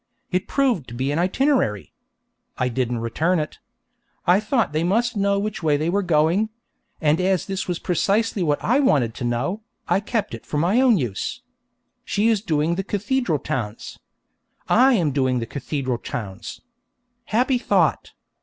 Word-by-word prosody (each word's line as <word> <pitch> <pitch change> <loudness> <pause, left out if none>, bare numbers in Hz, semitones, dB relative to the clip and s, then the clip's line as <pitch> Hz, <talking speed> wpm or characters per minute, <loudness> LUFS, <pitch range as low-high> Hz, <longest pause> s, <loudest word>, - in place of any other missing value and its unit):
It 180 +1 -1
proved 250 - +1
to 120 - -9
be 130 +3 -1
an 150 - 0
itinerary. 185 - +1 0.6
I 125 - 0
didn't 125 -1 -1
return 160 +10 0
it. 155 -1 -4 0.7
I 180 +3 +5
thought 225 - 0
they 155 +2 0
must 230 +7 +1
know 200 0 +1
which 210 0 -3
way 150 -3 +2
they 155 +3 -1
were 200 +2 +1
going; 175 +4 +2 0.5
and 155 +2 +2
as 185 -3 +1
this 195 0 -3
was 175 -2 -1
precisely 200 +5 0
what 150 -4 0
I 250 +5 +3
wanted 135 - +2
to 125 - -7
know, 125 - -1 0.3
I - - +3
kept 210 - -2
it 115 - -7
for 150 - -4
my 185 - +3
own 250 -5 +5
use. 120 - -3 0.6
She 215 +3 +1
is 220 -3 +2
doing 160 -4 0
the 195 +3 -2
cathedral 205 - 0
towns. 115 -5 -5 0.7
I 260 +3 +5
am 170 -10 +2
doing 130 -2 +1
the 115 - -2
cathedral 130 -1 -3
towns. 110 -3 -6 0.6
Happy 250 +3 +1
thought! - - +1
175 Hz, 165 wpm, -22 LUFS, 135-215 Hz, 0.7 s, I